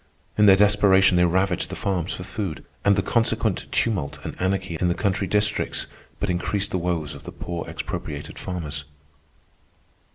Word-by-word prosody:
In 105 0 +5
their 95 - +9
desperation 100 -2 +5
they 90 0 +5
ravaged 95 +1 +1
the - - -5
farms 95 -3 -1
for 90 - -7
food, 95 -4 -5 0.2
and 100 0 +5
the 95 - +1
consequent 115 -1 0
tumult 90 -12 0
and - - -5
anarchy 95 -2 0
in 90 - +3
the 85 - +1
country 100 -1 0
districts 105 +2 0 0.3
but 100 - -1
increased 100 +3 -1
the 90 - 0
woes 85 -3 -2
of 70 - -10
the 90 - -7
poor 85 -1 -5
expropriated - - -5
farmers. 75 -6 -5
95 Hz, 165 wpm, -24 LUFS, 85-100 Hz, 0.3 s, their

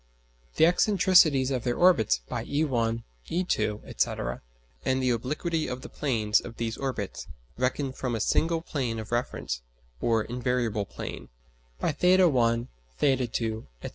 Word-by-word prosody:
the - - +3
excentricities 175 -7 +4
of 130 -3 -1
their 120 -1 -1
orbits 150 - +4
by - - -3
e_1, 120 -6 0 0.3
e_2, 165 - -2
&c. - - -1 0.4
and 130 0 +1
the 125 - +3
obliquity 150 +7 -1
of 125 +1 -5
the - - -8
planes 110 -7 +1
of 115 -1 -10
these 115 -1 -2
orbits, 125 -8 -4 0.3
reckoned 130 +2 -1
from 125 -3 -2
a - - -2
single 165 +9 +1
plane 125 -8 -2
of 110 0 -7
reference 120 - -2 0.4
or 115 -2 +2
"invariable 120 -4 -1
plane," - - -7 0.5
by - - +1
[theta]_1, 145 -9 +3 0.3
[theta]_2, 120 -5 0 0.2
&c. - - -4
125 Hz, 140 wpm, -27 LUFS, 115-150 Hz, 0.5 s, excentricities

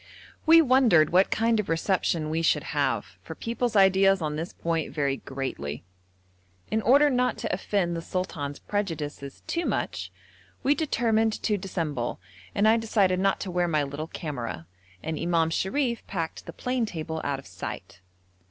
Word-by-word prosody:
We 330 0 +8
wondered 245 - +5
what 185 +3 +4
kind 225 0 +2
of 210 - -2
reception 165 -2 0
we 160 +1 0
should 165 - +2
have, - - -1
for - - -8
people's 235 0 -2
ideas 195 0 +5
on 155 -3 -2
this 165 +3 -4
point 165 -2 -2
vary 140 -1 0
greatly. 130 - -5 0.9
In 220 - +1
order 280 +6 +6
not 250 -1 +1
to - - -3
offend 180 -2 0
the 165 - -3
sultan's 160 -6 -4
prejudices 150 -9 -4
too 340 - -1
much, - - -2 0.5
we 280 - +4
determined 225 -8 +1
to 210 - +2
dissemble, 165 -10 -3 0.4
and 205 +2 +3
I 225 +1 +6
decided 200 -5 +2
not 195 +1 +2
to 190 - -4
wear 175 0 +1
my 155 -3 +1
little 145 +3 -5
camera, 125 - -5 0.4
and 160 0 -3
Imam 165 -1 +1
Sharif 235 - -1
packed 165 -4 -4
the - - -7
plane 250 -2 -1
table 160 -3 -4
out 140 -1 -1
of 135 - -11
sight. - - -8
180 Hz, 160 wpm, -27 LUFS, 155-220 Hz, 0.9 s, We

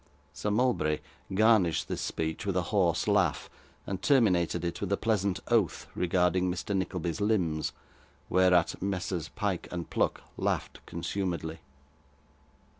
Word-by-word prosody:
Sir 105 - -2
Mulberry 105 -9 +2 0.3
garnished 100 -4 +3
this - - -3
speech 80 0 -2
with 100 -2 -1
a 90 - +1
hoarse 90 -5 +2
laugh, - - +2 0.3
and 95 -1 -4
terminated 90 - +3
it 85 - -3
with 100 -1 -2
a 100 - +3
pleasant 100 -4 0
oath 110 -8 +2
regarding 90 +1 +2
Mr. 95 +3 -3
Nickleby's 90 -1 -2
limbs, 90 -8 +1 0.6
whereat 90 -2 +3
Messrs 90 -3 -2
Pyke 100 -5 -2
and 85 -1 -5
Pluck - - 0
laughed - - -2
consumedly. 85 -2 -3
90 Hz, 125 wpm, -29 LUFS, 85-100 Hz, 0.6 s, garnished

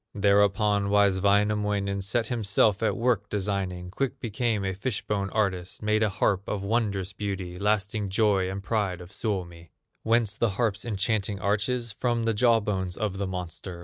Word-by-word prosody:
Thereupon 100 0 +3
wise 100 -2 +3
Wainamoinen 100 0 +1
Set 110 +4 0
himself 105 -2 +2
at 110 - +1
work 115 -4 +1
designing; 95 -3 -2
Quick 135 +5 -2
became 110 -2 -1
a 95 - -1
fish 100 +3 -3
bone 100 -2 -1
artist, 95 -3 -2
Made 105 0 +2
a 110 - +3
harp 95 0 0
of 100 -2 -3
wondrous 100 -3 -1
beauty, 95 -3 -4
Lasting 105 0 0
joy 100 -2 +2
and 95 +1 -5
pride 100 -5 -1
of 90 +1 -11
Suomi. 90 -6 -4 0.3
Whence 110 -2 +1
the 115 - +2
harp's 110 -3 0
enchanting 105 -1 0
arches? 110 +5 0
From 120 +2 -1
the 115 0 +1
jaw 115 +1 +4
bones 95 -4 -2
of 100 -3 -2
the 100 - -1
monster. 90 -1 -6
100 Hz, 165 wpm, -27 LUFS, 95-110 Hz, 0.3 s, jaw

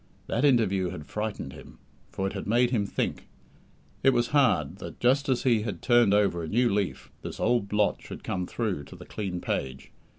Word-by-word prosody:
That 120 - -1
interview 105 -9 +3
had 75 -3 -7
frightened 105 -10 -4
him, - - -13 0.3
for 95 - -3
it 95 - -2
had - - -5
made 120 +3 +3
him 105 -5 +1
think. - - -3 0.7
It 135 - +5
was 120 -1 +1
hard 95 - +2
that, - - -9
just 135 +3 +2
as 130 -2 +1
he 120 -5 +3
had 105 -6 -5
turned 120 -4 +5
over 100 -4 +2
a 80 - -4
new 120 +4 +2
leaf, 100 -2 -2
this - - -7
old 120 -4 +2
blot 105 0 +1
should - - -9
come 90 -1 -2
through 100 -11 -2
to - - -12
the - - -11
clean 95 -4 -4
page. 65 0 -3
105 Hz, 200 wpm, -27 LUFS, 95-120 Hz, 0.7 s, It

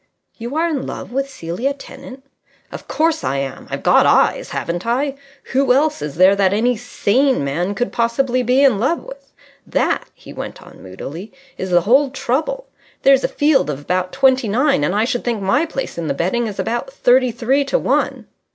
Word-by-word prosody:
"You 240 +5 -5
are 330 +2 +1
in 295 -6 -3
love - - -7
with 275 +2 -2
Celia 235 +6 -3
Tennant?" 265 -1 -12 0.5
"Of - - -9
course 320 +1 0
I 135 - -1
am. 135 -1 -5
I've - - -5
got - - +5
eyes, - - +2
haven't 175 +2 -3
I? 265 +4 0 0.4
Who 265 -1 +3
else 300 +3 +1
is 150 -2 -5
there 185 +3 +5
that 195 -1 +3
any 245 +3 +2
sane 245 - +1
man 175 +8 -2
could 245 +3 -2
possibly 245 +2 0
be 250 +3 +3
in 255 -8 +4
love 265 +10 0
with? - - -12 0.4
That," - - 0
he - - -13
went - - -7
on, - - -15
moodily, 145 - -8 0.2
"is 190 - -5
the 175 -1 +4
whole 265 +9 +3
trouble. 310 - -2 0.4
There's 270 -1 +5
a - - +2
field 290 - +2
of 145 -2 -3
about 180 +4 -2
twenty 260 -3 +3
nine, 250 - +2
and 180 +6 0
I 215 +2 +2
should 245 0 -2
think 235 -3 -1
my 200 +12 +1
place 270 - -5
in 165 - -3
the - - -1
betting 225 +10 0
is 205 - -6
about 240 - -3
thirty 255 - +3
three 245 +4 +1
to - - +1
one." - - -1
245 Hz, 195 wpm, -19 LUFS, 195-275 Hz, 0.5 s, got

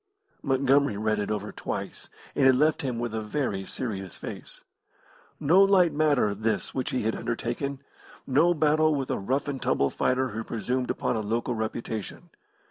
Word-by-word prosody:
Montgomery 135 -3 +2
read 110 0 0
it 105 - -2
over 105 0 -3
twice, - - -5 0.2
and 135 - +4
it 130 - +6
left 150 +4 +2
him 125 -4 -2
with 120 -1 -3
a 110 - -2
very 105 -4 -2
serious 95 -7 -5
face. - - -7 0.8
No 165 +6 +5
light 195 -4 +5
matter 145 -8 +2
this 110 +1 -1
which 130 - -2
he 130 - -1
had 110 +1 0
undertaken; 130 +4 -3 0.4
no 160 +6 +3
battle 155 0 +3
with 135 -2 -2
a - - -1
rough 130 +9 -1
and 140 -2 -3
tumble 70 - +1
fighter 130 0 +1
who 110 +2 -4
presumed 125 +4 -2
upon 115 - -1
a - - -1
local 115 +4 -1
reputation. 110 - -5
125 Hz, 170 wpm, -27 LUFS, 110-145 Hz, 0.8 s, it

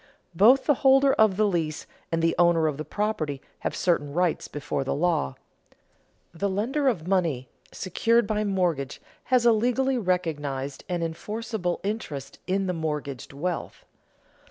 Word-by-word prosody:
Both 230 +10 +5
the 295 - +5
holder 270 0 +5
of 215 -4 +3
the 215 - +4
lease 165 -6 -1 0.3
and 165 0 0
the 165 0 +3
owner 170 -2 +4
of 150 -3 0
the 155 - -4
property 155 -5 -2 0.2
have - - -3
certain 145 -5 0
rights 175 0 0
before 145 -1 -3
the 135 - -2
law. 150 - 0 1.0
The 200 +4 -1
lender 245 +9 0
of 180 -10 0
money 165 -10 0 0.2
secured 230 +5 +1
by 215 0 0
mortgage 175 -9 -1 0.3
has 250 -2 +3
a 235 - +7
legally 250 +4 +1
recognized 150 - -2
and 175 -2 -1
enforceable 210 +2 -3
interest 180 - -5
in 195 +1 +1
the 180 - -1
mortgaged 150 -5 -4
wealth. 165 +5 -4
180 Hz, 150 wpm, -26 LUFS, 155-215 Hz, 1.0 s, a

